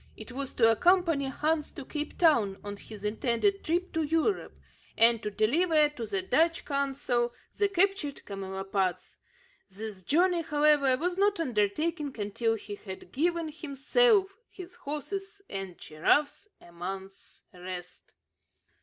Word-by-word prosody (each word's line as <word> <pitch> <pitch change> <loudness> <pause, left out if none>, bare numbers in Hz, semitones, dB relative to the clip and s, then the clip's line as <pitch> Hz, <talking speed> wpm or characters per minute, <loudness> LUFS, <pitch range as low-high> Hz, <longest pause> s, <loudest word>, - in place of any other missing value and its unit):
It - - -9
was 270 +1 -4
to 225 -2 +5
accompany 335 - +3
Hans 300 +3 -1
to 280 - -8
Cape 300 +1 -5
Town 230 - +3
on 205 0 -5
his 210 0 -11
intended 235 - 0
trip 350 +3 -1
to 325 - 0
Europe, 325 +6 0 0.4
and 230 0 +5
to 210 - -3
deliver 300 - +3
to 245 -7 -6
the 385 -2 -1
Dutch 330 -2 +2
consul 270 -4 -1 0.2
the 405 - +2
captured 390 -6 +1
camelopards. 190 -2 -3 0.5
This 205 0 -8
journey, 345 - +2
however, 295 -4 +3
was 355 +5 -2
not 405 -2 +3
undertaken 290 - 0
until 225 +2 0
he 205 -1 -8
had 190 -2 -9
given 335 +3 0
himself, 385 - +2
his 365 -1 -10
horses, 390 +8 -6
and 195 -2 -6
giraffes 285 - 0
a 175 - -17
month's 190 +3 -8
rest. 180 0 -9
280 Hz, 135 wpm, -29 LUFS, 210-335 Hz, 0.5 s, to